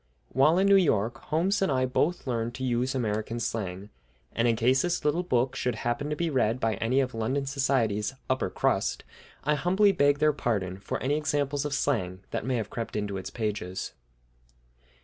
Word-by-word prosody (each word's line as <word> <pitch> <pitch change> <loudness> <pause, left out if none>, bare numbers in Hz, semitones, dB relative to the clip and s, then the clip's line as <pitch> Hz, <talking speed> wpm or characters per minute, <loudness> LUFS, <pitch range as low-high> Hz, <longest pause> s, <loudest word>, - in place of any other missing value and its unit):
While 150 +6 +4
in 190 - +3
New 200 0 +6
York 120 - +1
Holmes 185 +7 +1
and 190 - +2
I 130 -1 +2
both 155 +7 0
learned 120 -2 -2
to 130 - -5
use 125 +2 0
American 110 -1 -2
slang, 100 -3 -4 0.4
and 115 +1 +1
in 115 - +3
case 125 +4 +3
this 175 -2 -1
little 150 +4 +2
book 130 -7 0
should 125 -2 -1
happen 120 +6 -2
to 150 - -1
be 165 +1 -1
read 125 -3 +1
by 115 -3 +1
any 125 +4 +2
of 130 -1 -2
London 130 +5 -1
society's 130 -5 0
"upper 130 -7 0
crust," - - 0 0.4
I 150 - +2
humbly 190 +7 +3
beg 145 -6 +3
their 150 +1 +3
pardon 100 -9 -2
for - - -3
any 145 +3 +1
examples 145 -2 -1
of 145 -2 -1
slang 95 -11 -1
that 115 - -3
may 130 - +1
have 110 -3 -3
crept 115 -1 -5
into 105 -2 -2
its 95 - -5
pages. 100 -4 -3
130 Hz, 190 wpm, -28 LUFS, 110-145 Hz, 0.4 s, New